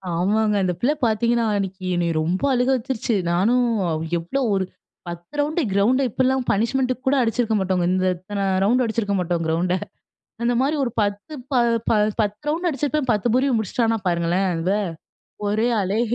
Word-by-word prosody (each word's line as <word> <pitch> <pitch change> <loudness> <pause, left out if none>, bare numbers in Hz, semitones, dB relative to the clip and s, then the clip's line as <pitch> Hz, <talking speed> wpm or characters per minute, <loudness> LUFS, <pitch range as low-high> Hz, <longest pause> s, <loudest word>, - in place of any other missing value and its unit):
ஆமாங்க. 210 +4 +1
அந்த 180 -1 +1
பிள்ளை 280 +5 +3
பாத்தீங்கன்னா, 235 +1 +1
அன்னைக்கு 190 -1 -4
என்னை 170 -1 0
ரொம்ப 175 - -1
அழுக 250 +1 +1
வச்சுடுச்சு. 240 -2 -2 0.2
நானும் 235 +8 +3 0.5
எவ்வளோ 175 +12 -2
ஒரு 190 -1 +1 0.4
10 170 +4 -8
ரவுண்ட் 305 +4 +1
கிரவுண்ட, 235 +7 +3
இப்பெல்லாம் 260 +3 +1
பனிஷ்மென்ட் 255 +5 +1
கூட 280 - +4
அடிச்சிருக்க 230 -1 0
மாட்டோங்க, 185 -2 0
இந்த 185 0 +1
இத்தனை 200 +2 -4 0.2
ரவுண்டு 245 +5 +3
அடிச்சிருக்க 220 -3 -1
மாட்டோம் 175 -1 -1
கிரவுண்ட, 170 +3 0 0.7
அந்த 240 +1 +2
மாரி 300 +3 +1
ஒரு 240 - -2
10 205 +8 -3 0.2
ப - - +1 0.7
10 210 +8 -4
ரவுண்டு 340 +3 0
அடிச்சிருப்பேன், 290 -1 -1
10 215 +2 0
பூரியும் 255 -2 +2
முடிச்சுட்டானா 225 +2 0
பாருங்களேன், 175 +2 +1
அவ 180 +5 0 0.7
ஒரே 220 +3 +1
ஆளே. 200 +3 0
220 Hz, 150 wpm, -22 LUFS, 185-250 Hz, 0.7 s, கூட